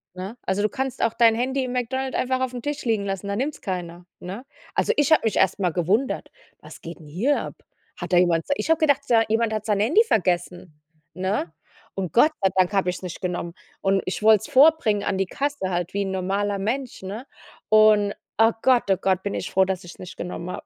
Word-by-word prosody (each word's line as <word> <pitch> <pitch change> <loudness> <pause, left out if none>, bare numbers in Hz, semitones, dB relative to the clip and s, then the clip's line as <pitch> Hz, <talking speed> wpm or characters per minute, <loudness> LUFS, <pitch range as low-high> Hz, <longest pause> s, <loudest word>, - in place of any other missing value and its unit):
Ne? 190 +6 -7
Also 190 +2 0
du 210 - +1
kannst 265 0 -3
auch 230 - +1
dein 230 -1 +5
Handy 260 +3 -1
im 250 - -5
McDonald 260 +2 -2
einfach 260 0 0
aufm 250 -1 -3
Tisch 290 +2 -4
liegen 220 -4 0
lassen, 195 0 -4
da 200 - -2
nimmt's 275 +7 -3
keiner, 175 -2 -5
ne? 195 +8 -8 0.3
Also, - - +2
ich 295 +1 +1
habe 315 - +6
mich 220 - 0
erst 190 - +3
mal 180 -3 +1
gewundert: 190 - -1 0.3
„Was - - -13
geht 165 +1 -9
'n 155 - -14
hier 220 - 0
ab? - - -7 0.4
Hat - - -6
da - - +6
jemand 175 -2 +3
sei“ 285 - 0
Ich - - -4
habe 325 - +4
gedacht, 285 -3 +2
sei 225 -2 +4
jemand 225 0 +1
hat 215 0 -3
sein 210 -2 +1
Handy 305 - +4
vergessen, 175 - -1 0.4
ne? 185 -2 -2 0.4
Und 185 -5 -4
Gott 300 +6 +5
sei 190 - +3
Dank 185 +1 +2
hab 195 -2 +2
ich's 180 0 -2
nicht 180 -2 -7
genommen. 175 -2 -3 0.3
Und 195 0 +2
ich 185 - -4
wollt's 215 +1 +4
vorbringen 280 -7 +4
an 190 - -1
die 195 - +1
Kasse 275 -3 -3
halt 175 -1 -2
wie 200 - +1
'n 195 - -4
normaler 195 +2 -1
Mensch, 245 +6 -3
ne? 200 +7 -7 0.4
Und 215 -1 +5 0.2
oh 225 +1 +5
Gott, 255 -2 +4
oh 190 - +3
Gott, 190 0 0
bin 200 - -3
ich - - -4
froh, 190 0 +3
dass 190 -1 -3
ich's 175 - -12
nicht 185 0 -9
genommen 175 0 -6
hab. - - -7
205 Hz, 225 wpm, -23 LUFS, 185-250 Hz, 0.4 s, habe